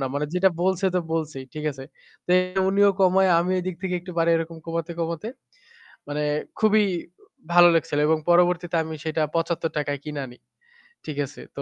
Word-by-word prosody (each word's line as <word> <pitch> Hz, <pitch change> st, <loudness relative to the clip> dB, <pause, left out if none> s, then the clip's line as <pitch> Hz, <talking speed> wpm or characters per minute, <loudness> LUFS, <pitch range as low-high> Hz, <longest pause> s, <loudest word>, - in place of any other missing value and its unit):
না, 135 Hz, -, -1 dB
মানে 150 Hz, +1 st, -1 dB
যেটা 190 Hz, +1 st, +4 dB
বলছে 190 Hz, +1 st, +1 dB
তো 180 Hz, -, +3 dB
বলছেই 155 Hz, -4 st, -3 dB
ঠিক 155 Hz, 0 st, -5 dB
আছে। 135 Hz, -1 st, -10 dB, 0.4 s
তো -, -, -4 dB, 0.4 s
উনিও 200 Hz, +1 st, +4 dB
কমায় 190 Hz, 0 st, +4 dB
আমি 175 Hz, +2 st, 0 dB
এদিক 185 Hz, 0 st, -4 dB
থেকে 185 Hz, -1 st, -2 dB
একটু 180 Hz, +1 st, -9 dB
বারাই 165 Hz, 0 st, +3 dB
এরকম 165 Hz, 0 st, -4 dB
কমাতে, 165 Hz, 0 st, -3 dB
কমাতে 170 Hz, +5 st, -3 dB, 0.8 s
মানে 145 Hz, +1 st, -3 dB, 0.4 s
খুবই 215 Hz, 0 st, +4 dB, 0.7 s
ভালো 175 Hz, 0 st, +8 dB
লেগেছিল 150 Hz, -2 st, 0 dB
এবং 160 Hz, 0 st, +3 dB
পরবর্তীতে 175 Hz, 0 st, +3 dB
আমি 160 Hz, 0 st, -6 dB
সেটা 160 Hz, 0 st, -1 dB
৳৭৫ 165 Hz, -3 st, -1 dB
য় 140 Hz, -, -6 dB
কিনে 150 Hz, -2 st, -5 dB
আনি। 125 Hz, -, -13 dB, 0.7 s
ঠিক 150 Hz, -2 st, -6 dB
আছে? 140 Hz, -, -13 dB, 0.2 s
তো -, -, -4 dB
165 Hz, 175 wpm, -24 LUFS, 155-180 Hz, 0.8 s, ভালো